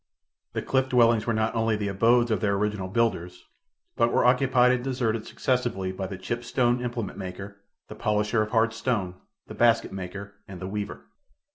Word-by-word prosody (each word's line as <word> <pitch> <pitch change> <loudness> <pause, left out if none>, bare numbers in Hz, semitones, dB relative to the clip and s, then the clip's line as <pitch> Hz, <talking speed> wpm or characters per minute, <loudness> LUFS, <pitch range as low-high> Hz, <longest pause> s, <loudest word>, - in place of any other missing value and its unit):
The - - -3
cliff 130 0 +1
dwellings 115 -3 +3
were 115 - +2
not 110 0 0
only 115 -1 +1
the 105 -1 -2
abodes 115 +4 +3
of 105 -5 0
their 100 -1 +1
original 105 -2 -1
builders, 95 -4 -1 0.5
but 115 0 +2
were - - +2
occupied 125 0 +4
and 125 -1 0
deserted 120 -4 -1
successively 120 -8 -1
by 95 0 -5
the 95 - -7
chipped 120 +6 -4
stone 120 0 +1
implement 120 -5 -4
maker, 100 +2 -8 0.3
the - - -8
polisher 105 +1 0
of 105 - -2
hard 115 0 +2
stone, 115 -6 -1 0.3
the - - -10
basket 115 -1 +3
maker 100 +2 -7
and 95 -2 -9
the 95 - -6
weaver. 105 +1 -5
110 Hz, 180 wpm, -26 LUFS, 100-120 Hz, 0.5 s, occupied